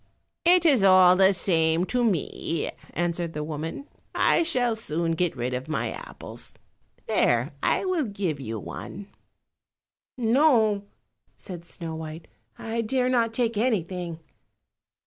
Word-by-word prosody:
"It 350 0 +5
is 270 -10 +5
all 185 -1 +7
the 190 +1 +5
same 170 -2 +2
to 245 +4 0
me," 170 -5 -1 0.2
answered 170 -1 -1
the 150 - -3
woman, 160 - -5 0.3
"I - - +3
shall 250 -9 +1
soon 165 -6 -2
get 165 -1 0
rid 125 +1 -2
of 125 +2 -4
my 155 - -2
apples. - - -10 0.5
There, - - +2
I - - +1
will 365 -6 0
give 195 - -3
you 115 -4 -5
one." 195 - -8 1.1
"No," 230 -4 +3 0.5
said 175 -3 -9
Snow 165 -2 -7
white, 160 +1 -8 0.3
"I 230 +1 -3
dare 250 +3 0
not 235 -3 +2
take 230 -1 -1
anything." 180 -7 -1
190 Hz, 130 wpm, -26 LUFS, 165-235 Hz, 1.1 s, all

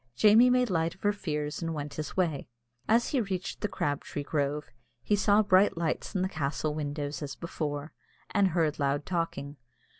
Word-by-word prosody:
Jamie 215 - +6
made 250 -3 +3
light 165 -1 0
of 190 - -27
her 205 0 +3
fears 150 -6 -3
and 165 -1 -2
went 145 -1 -5
his 155 +3 -6
way. 165 -7 0 0.4
As 230 +2 +4
he 270 - +1
reached 190 -3 -4
the 210 - +1
crabtree 145 -4 -3
grove, 145 0 -2 0.3
he 210 - +2
saw 205 +1 +4
bright 190 -2 +4
lights 170 +5 -2
in 185 - +1
the - - +1
castle 155 -2 -2
windows 145 -2 -3
as 140 -2 -5
before, 150 -3 -4 0.4
and 200 -2 +4
heard 160 -4 0
loud 140 +1 0
talking. 165 -5 -3
160 Hz, 180 wpm, -29 LUFS, 145-195 Hz, 0.4 s, Jamie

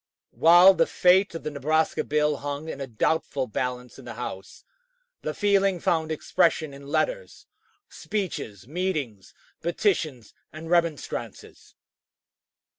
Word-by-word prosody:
While 175 +4 +7
the - - +2
fate 185 0 +3
of 165 - -6
the 155 - -4
Nebraska 155 +3 0
bill 150 0 +1
hung 145 +2 -5
in 140 - -6
a 135 - -4
doubtful 135 +3 -1
balance 125 +2 -4
in 130 - -13
the 120 -2 -8
House, 95 -5 -7 0.6
the - - -4
feeling 195 -3 +2
found 160 -1 0
expression 155 -1 +1
in 140 0 -12
letters, - - -2 0.4
speeches, 120 - -5
meetings, 150 - -4 0.3
petitions, 160 - -1 0.2
and 160 +2 -9
remonstrances. 170 -4 -2
155 Hz, 120 wpm, -25 LUFS, 135-175 Hz, 0.6 s, While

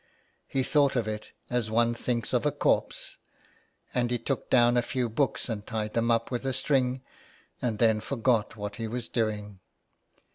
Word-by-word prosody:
He 135 - 0
thought 140 0 +3
of 115 -4 0
it 105 0 -4 0.2
as 120 -3 0
one 115 +1 +3
thinks 120 0 -2
of 125 - +2
a 150 - +2
corpse, 145 - 0 0.8
and 120 -1 +1
he 120 - +1
took 130 +3 -3
down 120 -1 +5
a 120 - +4
few 125 0 -1
books 125 +5 0
and 110 -4 -3
tied 110 0 -3
them 115 0 +1
up 115 +1 +1
with 125 0 -2
a 135 -1 -1
string, 130 -1 +1 0.6
and 115 -4 -1
then 110 -1 +4
forgot 115 -5 +1
what 105 -1 -5
he 115 - -3
was 120 +1 -4
doing. 105 -4 -2
120 Hz, 180 wpm, -28 LUFS, 110-125 Hz, 0.8 s, down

